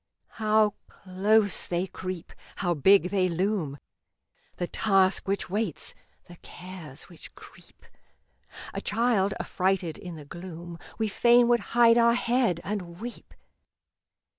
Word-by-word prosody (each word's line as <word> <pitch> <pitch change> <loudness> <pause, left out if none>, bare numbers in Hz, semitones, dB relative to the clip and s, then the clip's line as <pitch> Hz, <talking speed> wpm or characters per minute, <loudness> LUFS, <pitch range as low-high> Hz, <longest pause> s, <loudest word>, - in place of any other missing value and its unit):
How 215 0 +4 0.2
close 205 +2 0
they 175 +1 -1
creep! 185 -2 -7 0.2
How 175 -3 0
big 180 +4 +4
they 185 -2 +2
loom! 175 -5 -1 0.8
The 175 - -2
Task 195 0 +2
which 195 +1 -1
waits, 200 -3 -3 0.3
the 175 - -13
Cares 175 -7 -10
which 170 - -15
creep; - - -17 0.9
A - - -4
child, 210 -3 +1
affrighted 185 -4 -1
in 175 -2 -8
the 150 -2 -10
gloom, 170 +1 -9 0.2
We 220 - 0
fain 240 +3 +4
would 240 0 +4 0.2
hide 235 0 +6
our 235 0 +5
head 240 -8 +1
and 180 -4 -5
weep. 240 +2 -9
190 Hz, 125 wpm, -27 LUFS, 175-215 Hz, 0.9 s, hide